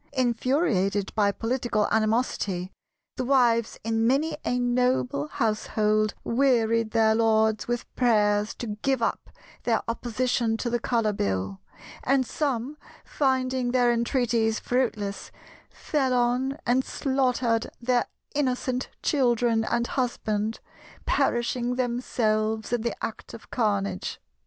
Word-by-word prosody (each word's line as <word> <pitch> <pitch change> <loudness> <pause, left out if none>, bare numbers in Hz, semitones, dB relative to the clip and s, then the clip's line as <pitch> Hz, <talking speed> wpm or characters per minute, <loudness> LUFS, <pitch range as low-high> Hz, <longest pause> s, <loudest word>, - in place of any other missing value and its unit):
Infuriated 240 - +1
by 205 -2 +3
political 230 -1 -1
animosity, 215 -5 0 0.5
the - - -1
wives 240 -3 +2
in 225 0 +1
many 300 +5 +1
a 245 - 0
noble 245 - +1
household 215 +2 0
wearied 230 -3 +2
their 220 -1 +3
lords 220 -1 +2
with 240 0 -2
prayers 210 -3 +2
to 215 -3 -5
give 265 -3 +1
up - - -2 0.3
their 230 -2 0
opposition 235 0 0
to 240 +1 -3
the 240 - +1
Colour 230 -3 0
Bill; 95 - -2 0.4
and 265 0 +2
some, 275 0 -2 0.3
finding 260 -2 0
their 245 -1 +3
entreaties 235 -2 +1
fruitless, 215 -5 -2 0.4
fell 265 -4 -1
on 250 +3 +1
and 250 +2 +2
slaughtered 255 -5 0
their 245 0 +1 0.3
innocent 255 -2 -1
children 240 -5 +2
and 235 +1 0
husband, 225 -4 -2 0.5
perishing 240 +1 0
themselves 220 -3 -1
in 240 - +1
the 235 0 -2
act 225 - -8
of 225 - -14
carnage. 200 - -1
235 Hz, 115 wpm, -26 LUFS, 220-255 Hz, 0.5 s, by